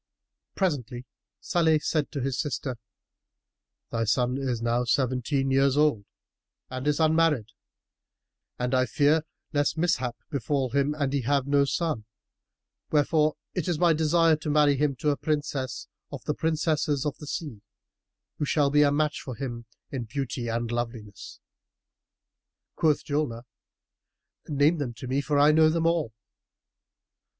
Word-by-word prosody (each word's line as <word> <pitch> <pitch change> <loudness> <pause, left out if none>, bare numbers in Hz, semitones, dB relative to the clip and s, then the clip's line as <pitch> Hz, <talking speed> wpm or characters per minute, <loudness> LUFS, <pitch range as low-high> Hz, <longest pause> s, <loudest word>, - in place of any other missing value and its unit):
[FN#318] - - -59
Presently 130 - -2 0.4
Salih 165 -5 +2
said 150 -1 -1
to 140 - -3
his 135 0 -2
sister, 130 -3 -3 1.1
"Thy 115 0 0
son 125 +3 +1
is 130 -4 -1
now 120 +1 0
seventeen 130 +3 0
years 135 +1 +3
old 150 -9 +2 0.7
and 130 +2 -4
is 150 +1 +1
unmarried, 160 -7 +3 1.1
and 125 +1 -2
I 130 0 +3
fear 155 +1 +3 0.3
lest 145 +2 +1
mishap 130 -8 0
befal 135 -1 -1
him 140 +2 +1
and 140 -3 -1
he 140 - +1
have 140 +2 +1
no 140 0 +3
son; 145 -6 -2 0.8
wherefore 155 0 +2 0.2
it 180 -5 -2
is 175 -3 0
my 170 0 +4
desire 160 +1 +3
to 155 0 -5
marry 145 -1 +4
him 140 0 0
to 150 +4 0
a 145 - -1
Princess 145 -4 -2 0.2
of - - -7
the - - 0
princesses 155 -3 0
of 145 - -1
the 150 - -9
sea, 140 -10 -5 0.8
who 150 - 0
shall 145 -1 +2
be 150 0 +5
a 145 -1 +5
match 150 +1 0
for 130 - -7
him 120 -1 -5 0.3
in 130 -4 -4
beauty 125 0 -4
and 115 0 -2
loveliness." 115 -4 -5 1.4
Quoth 155 -2 +1
Julnar, 145 -6 -2 1.0
"Name 150 +2 +2
them 125 -5 -3
to 115 - -8
me 130 +3 0
for 145 0 0
I 145 +1 +6
know 155 0 +5
them 165 +1 0
all." 165 -8 +1
145 Hz, 150 wpm, -27 LUFS, 125-155 Hz, 1.4 s, I